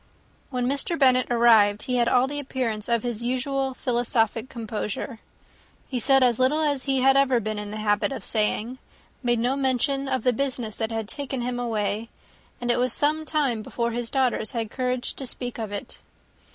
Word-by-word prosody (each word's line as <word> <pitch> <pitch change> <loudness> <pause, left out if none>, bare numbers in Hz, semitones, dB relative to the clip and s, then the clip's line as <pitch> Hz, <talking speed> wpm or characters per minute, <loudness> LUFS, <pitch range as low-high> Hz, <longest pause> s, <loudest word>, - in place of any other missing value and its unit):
When 250 -2 -1
Mr. 280 +6 0
Bennet 255 -3 +4
arrived, 225 -4 +5
he 250 -1 -1
had 235 -1 +3
all 250 0 +4
the 290 +2 -3
appearance 245 -6 -3
of 235 -2 +1
his 240 -2 -3
usual 265 +2 -1
philosophic 235 -2 0
composure. 225 +1 -4 0.7
He 255 - -2
said 270 +2 +4
as 245 -2 +3
little 260 +4 +3
as 285 -4 0
he 270 -2 +1
had 270 +1 +5
ever 270 -3 +4
been 215 -1 -3
in 210 0 -6
the 215 - -5
habit 210 +3 +1
of 270 - -5
saying; 225 +3 -1 0.4
made 240 -2 +2
no 245 +4 +1
mention 275 +1 0
of 260 -3 -1
the 250 - +3
business 245 -4 -2
that 225 0 -2
had 225 -2 -3
taken 270 +1 -4
him 245 0 -2
away; 220 -1 -2 0.5
and 245 0 0
it 240 - +1
was 250 -1 +2
some 310 +2 +1
time 280 -8 0
before 235 +2 -2
his 235 0 -3
daughters 255 -5 0
had 225 -2 -3
courage 250 -1 -1
to 270 - -5
speak 245 -1 -5
of 220 -2 -4
it. 205 - -6
245 Hz, 190 wpm, -25 LUFS, 225-265 Hz, 0.7 s, arrived